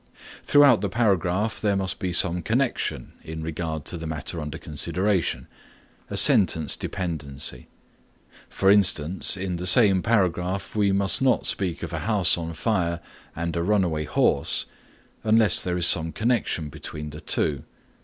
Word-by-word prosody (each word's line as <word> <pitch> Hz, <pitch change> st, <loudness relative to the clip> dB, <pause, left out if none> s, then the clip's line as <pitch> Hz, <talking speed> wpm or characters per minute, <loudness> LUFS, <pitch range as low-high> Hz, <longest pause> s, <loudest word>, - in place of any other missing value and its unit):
Throughout 145 Hz, -7 st, +4 dB
the 100 Hz, -, -2 dB
paragraph 100 Hz, 0 st, 0 dB
there 105 Hz, -2 st, +1 dB
must 95 Hz, -2 st, -2 dB
be 95 Hz, -, -3 dB
some 90 Hz, 0 st, +1 dB
connection 120 Hz, -, -2 dB
in 80 Hz, 0 st, -7 dB
regard 80 Hz, -1 st, -5 dB
to 85 Hz, -, -1 dB
the 80 Hz, -, -6 dB
matter 80 Hz, +2 st, -5 dB
under 75 Hz, -1 st, -6 dB
consideration, 85 Hz, -3 st, -2 dB, 0.6 s
a -, -, -5 dB
sentence 80 Hz, -6 st, +5 dB
dependency. 75 Hz, -8 st, -5 dB, 0.8 s
For 95 Hz, 0 st, +2 dB
instance, 95 Hz, -3 st, +2 dB
in 95 Hz, -2 st, -4 dB
the 90 Hz, +1 st, -3 dB
same 100 Hz, -3 st, +4 dB
paragraph 95 Hz, -3 st, -1 dB
we 100 Hz, -2 st, +2 dB
must 100 Hz, +3 st, +1 dB
not 130 Hz, -2 st, +1 dB
speak 90 Hz, -4 st, -2 dB
of -, -, -6 dB
a -, -, -3 dB
house 100 Hz, -4 st, +3 dB
on 85 Hz, -1 st, -6 dB
fire 85 Hz, -2 st, -1 dB, 0.4 s
and 85 Hz, +1 st, -4 dB
a 85 Hz, -, -1 dB
runaway 85 Hz, -5 st, 0 dB
horse -, -, +1 dB, 0.6 s
unless 110 Hz, -2 st, +3 dB
there 90 Hz, -1 st, -2 dB
is 85 Hz, -, +3 dB
some 80 Hz, -1 st, +4 dB
connection 110 Hz, -9 st, -1 dB
between 75 Hz, +1 st, -8 dB
the 75 Hz, +2 st, -10 dB
two. 70 Hz, -3 st, 0 dB
90 Hz, 150 wpm, -24 LUFS, 80-100 Hz, 0.8 s, sentence